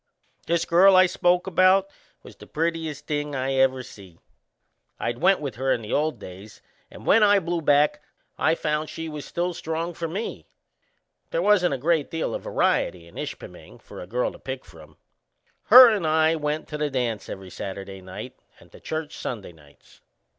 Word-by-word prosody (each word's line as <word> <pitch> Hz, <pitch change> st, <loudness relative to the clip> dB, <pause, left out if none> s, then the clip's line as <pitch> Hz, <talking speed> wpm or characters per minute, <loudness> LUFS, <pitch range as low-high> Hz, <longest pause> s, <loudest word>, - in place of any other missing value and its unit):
This 170 Hz, 0 st, +1 dB
girl 190 Hz, +3 st, +6 dB
I 185 Hz, 0 st, +7 dB
spoke 180 Hz, 0 st, +1 dB
about 190 Hz, +1 st, +4 dB, 0.4 s
was -, -, -13 dB
the -, -, -15 dB
prettiest 160 Hz, -2 st, -3 dB
thing 145 Hz, -1 st, -3 dB
I 135 Hz, +1 st, -1 dB
ever 130 Hz, -1 st, +2 dB
see. 95 Hz, -8 st, -14 dB, 0.8 s
I'd 120 Hz, +1 st, -3 dB
went 190 Hz, +3 st, +4 dB
with 135 Hz, -7 st, -6 dB
her 135 Hz, +1 st, 0 dB
in 115 Hz, -, 0 dB
the 105 Hz, -, -5 dB
old 155 Hz, +1 st, 0 dB
days, 95 Hz, +4 st, -12 dB, 0.3 s
and -, -, -13 dB
when 225 Hz, -, +5 dB
I 205 Hz, -1 st, +5 dB
blew 175 Hz, -2 st, -2 dB
back 150 Hz, 0 st, +3 dB, 0.3 s
I 160 Hz, -, +2 dB
found 150 Hz, -1 st, -2 dB
she 165 Hz, 0 st, -6 dB
was 150 Hz, -3 st, -7 dB
still 175 Hz, +1 st, -2 dB
strong 165 Hz, +1 st, -4 dB
for 165 Hz, +1 st, -4 dB
me. 195 Hz, +8 st, -6 dB, 0.8 s
They -, -, -3 dB
wasn't 185 Hz, -, +3 dB
a -, -, -5 dB
great 155 Hz, +2 st, 0 dB
deal 165 Hz, -1 st, -3 dB
o' -, -, -3 dB
variety 85 Hz, -2 st, 0 dB
in 85 Hz, -, -18 dB
Ishpeming -, -, -9 dB
for -, -, -11 dB
a 90 Hz, -, -9 dB
girl 125 Hz, +5 st, -1 dB
to -, -, -14 dB
pick 130 Hz, -1 st, -7 dB
from. 80 Hz, -3 st, -16 dB, 0.7 s
Her 250 Hz, +2 st, +10 dB
and 200 Hz, -7 st, -1 dB
I 160 Hz, +1 st, +3 dB
went 150 Hz, 0 st, -3 dB
to 150 Hz, -, -5 dB
the 150 Hz, -1 st, 0 dB
dance 120 Hz, -6 st, -3 dB
every 95 Hz, -1 st, -8 dB
Saturday 95 Hz, 0 st, -7 dB
night 95 Hz, 0 st, -9 dB, 0.2 s
and -, -, -20 dB
to -, -, -15 dB
church 155 Hz, -1 st, -5 dB
Sunday 105 Hz, -7 st, -6 dB
nights. 75 Hz, -3 st, -22 dB
150 Hz, 185 wpm, -24 LUFS, 120-170 Hz, 0.8 s, Her